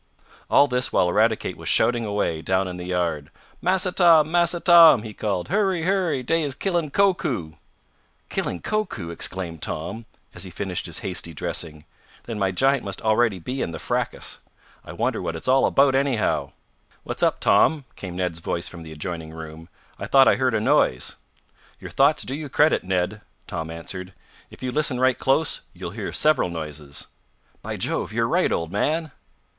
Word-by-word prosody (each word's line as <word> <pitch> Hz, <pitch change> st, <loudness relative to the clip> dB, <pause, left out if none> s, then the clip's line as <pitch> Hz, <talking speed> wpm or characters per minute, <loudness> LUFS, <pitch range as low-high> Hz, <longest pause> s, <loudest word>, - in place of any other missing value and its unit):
All 140 Hz, -, +6 dB
this 125 Hz, -2 st, -1 dB
while 90 Hz, -, +3 dB
Eradicate 110 Hz, +4 st, +1 dB
was -, -, -4 dB
shouting 120 Hz, -1 st, +3 dB
away, 100 Hz, -6 st, -1 dB
down 95 Hz, +3 st, 0 dB
in 90 Hz, -1 st, -6 dB
the 90 Hz, 0 st, -7 dB
yard. 85 Hz, -5 st, -1 dB, 0.3 s
"Massa 185 Hz, 0 st, +1 dB
Tom! 165 Hz, -4 st, +5 dB
Massa 175 Hz, 0 st, +2 dB
Tom!" 165 Hz, -, +7 dB
he 110 Hz, -2 st, -7 dB
called. 100 Hz, -4 st, -2 dB
"Hurry! 190 Hz, -4 st, +1 dB
Hurry! 175 Hz, -7 st, 0 dB
Dey 165 Hz, +6 st, +1 dB
is 140 Hz, -3 st, -2 dB
killin' 175 Hz, -5 st, -1 dB
Koku!" 140 Hz, -, +1 dB, 0.8 s
"Killing 85 Hz, -, -3 dB
Koku!" 210 Hz, -, -2 dB
exclaimed 85 Hz, -1 st, -4 dB
Tom, 95 Hz, +9 st, -4 dB, 0.3 s
as -, -, -6 dB
he -, -, -6 dB
finished -, -, -4 dB
his -, -, -6 dB
hasty 85 Hz, -3 st, -4 dB
dressing. 75 Hz, 0 st, -4 dB, 0.4 s
"Then 115 Hz, -3 st, -5 dB
my 95 Hz, -1 st, +2 dB
giant 135 Hz, +7 st, +2 dB
must 100 Hz, -1 st, -5 dB
already 110 Hz, -2 st, +2 dB
be 125 Hz, +10 st, -4 dB
in -, -, -1 dB
the 85 Hz, -, -6 dB
fracas. -, -, -3 dB, 0.4 s
I -, -, -9 dB
wonder -, -, -1 dB
what 80 Hz, -, -3 dB
it's 80 Hz, -, -7 dB
all 130 Hz, +1 st, +4 dB
about, 135 Hz, -1 st, +4 dB
anyhow." 120 Hz, -, 0 dB, 0.5 s
"What's -, -, -5 dB
up, -, -, +2 dB
Tom?" 155 Hz, -4 st, +3 dB
came 90 Hz, -3 st, -7 dB
Ned's 90 Hz, -2 st, -2 dB
voice 85 Hz, +1 st, -3 dB
from 85 Hz, -, -9 dB
the 80 Hz, -1 st, -10 dB
adjoining 80 Hz, +1 st, -6 dB
room. 80 Hz, 0 st, -10 dB, 0.3 s
"I -, -, -5 dB
thought 135 Hz, -1 st, +6 dB
I -, -, +5 dB
heard 130 Hz, -3 st, +1 dB
a -, -, +2 dB
noise." 65 Hz, -, +2 dB, 0.6 s
"Your -, -, -9 dB
thoughts 140 Hz, +3 st, +3 dB
do 130 Hz, -, -5 dB
you 150 Hz, 0 st, -5 dB
credit, 150 Hz, +3 st, +3 dB
Ned!" 95 Hz, +3 st, -1 dB, 0.2 s
Tom 80 Hz, 0 st, -5 dB
answered. 90 Hz, +3 st, -7 dB, 0.4 s
"If -, -, -14 dB
you 130 Hz, -, -2 dB
listen 145 Hz, -3 st, 0 dB
right 130 Hz, -1 st, +2 dB
close, 135 Hz, +4 st, +1 dB
you'll -, -, -7 dB
hear -, -, -5 dB
several 150 Hz, -11 st, +2 dB
noises." 75 Hz, -4 st, -6 dB, 0.6 s
"By -, -, -5 dB
Jove! -, -, -2 dB
You're -, -, 0 dB
right, -, -, +2 dB
old 85 Hz, 0 st, -2 dB
man!" 155 Hz, -, 0 dB
110 Hz, 180 wpm, -23 LUFS, -, 0.8 s, Tom